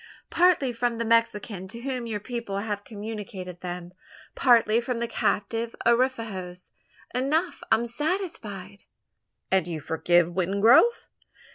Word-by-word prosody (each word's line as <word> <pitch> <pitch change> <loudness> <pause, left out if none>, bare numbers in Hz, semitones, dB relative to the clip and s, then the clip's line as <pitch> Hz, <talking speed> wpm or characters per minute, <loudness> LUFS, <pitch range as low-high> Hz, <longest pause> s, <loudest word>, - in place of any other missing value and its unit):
"Partly 335 -8 +3
from 235 0 -1
the 230 - -2
Mexican 220 -4 +1
to 235 +5 -9
whom 255 -2 -3
your 215 -2 -3
people 230 -2 -5
have 205 0 -3
communicated 205 -5 -7
them 175 0 -6 0.4
partly 230 -3 +4
from 240 0 -3
the 235 0 -2
captive 225 +1 -1
Arapahoes. 225 -7 0 0.4
Enough 300 +8 0
I - - +8
am 230 +2 -1
satisfied." 235 - -3 0.7
"And 190 -3 +2
you 165 -3 -4
forgive 170 +3 +2
Wingrove?" 200 - +4
225 Hz, 125 wpm, -26 LUFS, 190-240 Hz, 0.7 s, I